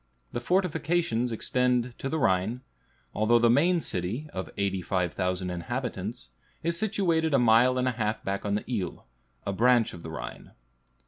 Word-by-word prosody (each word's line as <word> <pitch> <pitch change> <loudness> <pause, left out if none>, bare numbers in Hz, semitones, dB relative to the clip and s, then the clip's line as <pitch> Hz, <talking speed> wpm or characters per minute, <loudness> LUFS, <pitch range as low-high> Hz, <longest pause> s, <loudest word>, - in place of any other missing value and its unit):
The - - -2
fortifications 165 -6 +1
extend 125 +1 +1
to 135 - -3
the 160 - -1
Rhine, 105 -1 +1 0.5
although 110 +3 +4
the 120 0 +4
main 170 +7 +3
city, 105 - -3
of 95 - -4
85,000 90 -1 -1
inhabitants, 120 +4 -4 0.3
is 170 +1 0
situated 170 -6 +1
a - - +6
mile 125 +1 +5
and 125 0 +1
a - - +3
half 110 -2 -2
back 100 0 -2
on 100 0 0
the 105 - -3
Ill, 100 -9 -3 0.4
a 100 - -1
branch 120 +2 +3
of 85 - -9
the 80 - -7
Rhine. 80 - -8
120 Hz, 155 wpm, -28 LUFS, 100-135 Hz, 0.5 s, a